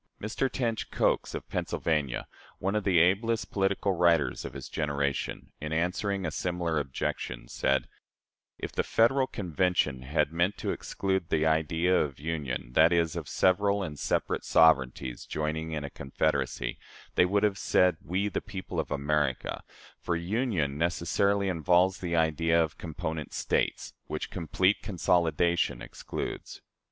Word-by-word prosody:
Mr. 120 Hz, +5 st, -1 dB
Tench 115 Hz, -5 st, -2 dB
Coxe, -, -, +1 dB
of -, -, -6 dB
Pennsylvania, 75 Hz, -6 st, -1 dB, 0.3 s
one 95 Hz, +2 st, -1 dB
of 105 Hz, -, 0 dB
the 95 Hz, -3 st, +3 dB
ablest 100 Hz, +7 st, +2 dB
political 100 Hz, 0 st, +1 dB
writers 85 Hz, -5 st, +2 dB
of -, -, -6 dB
his -, -, -7 dB
generation, 70 Hz, -3 st, -2 dB
in 75 Hz, 0 st, -4 dB
answering 90 Hz, +4 st, 0 dB
a 80 Hz, -, -1 dB
similar 85 Hz, -1 st, -1 dB
objection, -, -, -4 dB
said: 65 Hz, +2 st, 0 dB, 0.7 s
"If -, -, -5 dB
the -, -, 0 dB
Federal 130 Hz, +4 st, +3 dB
Convention 90 Hz, -, 0 dB
had 75 Hz, +3 st, 0 dB
meant 85 Hz, +4 st, +1 dB
to -, -, -2 dB
exclude 95 Hz, -3 st, -2 dB
the 80 Hz, -1 st, +2 dB
idea 80 Hz, +3 st, +2 dB
of 70 Hz, -3 st, -3 dB
'union' 70 Hz, -6 st, -3 dB
that 80 Hz, +4 st, +6 dB
is, 85 Hz, -2 st, +2 dB
of -, -, -5 dB
several 100 Hz, +2 st, +2 dB
and 75 Hz, -5 st, -6 dB
separate -, -, -1 dB
sovereignties 65 Hz, -5 st, +3 dB
joining 80 Hz, +1 st, -2 dB
in 75 Hz, -2 st, -3 dB
a 70 Hz, -, -6 dB
confederacy 70 Hz, -3 st, -1 dB, 0.3 s
they -, -, +5 dB
would 100 Hz, +3 st, +1 dB
have 100 Hz, -2 st, +2 dB
said, 90 Hz, -3 st, +3 dB
'We, 95 Hz, +4 st, -1 dB
the -, -, -2 dB
people 95 Hz, -3 st, -5 dB
of 80 Hz, -, -2 dB
America'; 75 Hz, -2 st, -1 dB, 0.4 s
for 85 Hz, -, -1 dB
union 85 Hz, -, -1 dB
necessarily 95 Hz, +4 st, +1 dB
involves 90 Hz, +2 st, +3 dB
the 85 Hz, -2 st, -2 dB
idea 80 Hz, +1 st, +2 dB
of 80 Hz, -2 st, -1 dB
competent 80 Hz, -1 st, -5 dB
States, -, -, -1 dB
which -, -, -4 dB
complete 95 Hz, +5 st, +1 dB
consolidation 85 Hz, -2 st, +1 dB
excludes." -, -, -6 dB
85 Hz, 145 wpm, -29 LUFS, 75-95 Hz, 0.7 s, that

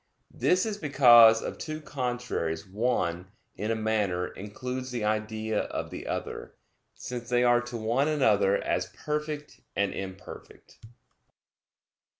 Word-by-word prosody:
This 185 Hz, +3 st, +2 dB
is 210 Hz, -2 st, -3 dB
because 120 Hz, -6 st, +7 dB
of -, -, -5 dB
two 155 Hz, -1 st, -5 dB
contraries 125 Hz, -, -3 dB
one, 95 Hz, -4 st, -1 dB, 0.3 s
in 105 Hz, +2 st, -3 dB
a 115 Hz, -, +1 dB
manner, 105 Hz, -5 st, 0 dB
includes 125 Hz, +6 st, -6 dB
the 120 Hz, -3 st, -3 dB
idea 110 Hz, 0 st, -1 dB
of -, -, -5 dB
the -, -, -7 dB
other, -, -, -5 dB, 0.4 s
since 120 Hz, -1 st, -6 dB
they 125 Hz, 0 st, +3 dB
are 120 Hz, 0 st, +4 dB
to 120 Hz, -1 st, -6 dB
one 115 Hz, +6 st, +1 dB
another 105 Hz, -10 st, +3 dB
as -, -, -1 dB
perfect 150 Hz, 0 st, -5 dB
and 100 Hz, 0 st, 0 dB
imperfect. 95 Hz, 0 st, -9 dB
120 Hz, 130 wpm, -28 LUFS, 105-130 Hz, 0.4 s, because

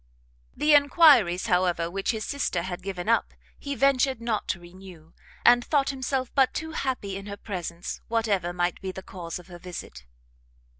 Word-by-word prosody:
The 300 Hz, 0 st, +4 dB
enquiries, 285 Hz, -, +5 dB
however, 180 Hz, -4 st, +1 dB
which 195 Hz, +3 st, -3 dB
his 220 Hz, -3 st, -1 dB
sister 230 Hz, -11 st, -1 dB
had 180 Hz, 0 st, -5 dB
given 185 Hz, -1 st, -5 dB
up, 230 Hz, 0 st, +1 dB, 0.2 s
he 280 Hz, 0 st, -4 dB
ventured 265 Hz, 0 st, +2 dB
not 230 Hz, -2 st, -2 dB
to 180 Hz, -, -2 dB
renew, 175 Hz, -2 st, -14 dB, 0.3 s
and 240 Hz, 0 st, +7 dB
thought 280 Hz, -1 st, +1 dB
himself 260 Hz, -1 st, -3 dB
but 270 Hz, -2 st, +3 dB
too 320 Hz, 0 st, -4 dB
happy 255 Hz, -10 st, -3 dB
in 195 Hz, +1 st, -7 dB
her 200 Hz, 0 st, -6 dB
presence, 175 Hz, -4 st, -6 dB
whatever 210 Hz, -6 st, 0 dB
might 175 Hz, 0 st, -1 dB
be 190 Hz, -, -4 dB
the 190 Hz, 0 st, -9 dB
cause 170 Hz, -3 st, -7 dB
of 180 Hz, -, -12 dB
her 175 Hz, -2 st, -12 dB
visit. 165 Hz, -, -9 dB
195 Hz, 170 wpm, -26 LUFS, 175-260 Hz, 0.3 s, and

